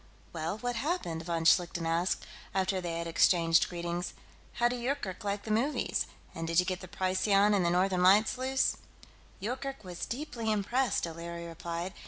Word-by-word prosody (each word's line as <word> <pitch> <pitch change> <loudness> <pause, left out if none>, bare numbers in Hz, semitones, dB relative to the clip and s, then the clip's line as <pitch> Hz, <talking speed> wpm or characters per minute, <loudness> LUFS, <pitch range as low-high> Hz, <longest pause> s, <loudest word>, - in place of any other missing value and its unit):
"Well, 165 +4 -2
what 245 +1 -2
happened?" 230 - -2
von 165 -1 -1
Schlichten 170 0 +3
asked, 165 +3 0 0.3
after 190 0 +1
they 170 -2 -3
had 170 - -3
exchanged 165 0 +4
greetings. 175 0 -3 0.4
"How 240 - +3
did 245 0 -3
Yoorkerk 240 -8 -3
like 200 0 -2
the 220 - -4
movies? 245 +8 0 0.3
And 165 0 -4
did 165 +1 +3
you 180 - +3
get 185 0 -2
the 185 - -8
Procyon 195 +3 +2
and 195 -3 +3
the 170 - +2
Northern 180 +1 +2
Lights 200 +6 +5
loose?" 265 +1 +1 0.6
"Yoorkerk 260 +5 -4
was 180 -2 -5
deeply 235 -4 -3
impressed," 230 +4 +1
O'Leary 170 +1 -6
replied. 170 +2 -5
185 Hz, 170 wpm, -31 LUFS, 170-225 Hz, 0.6 s, Lights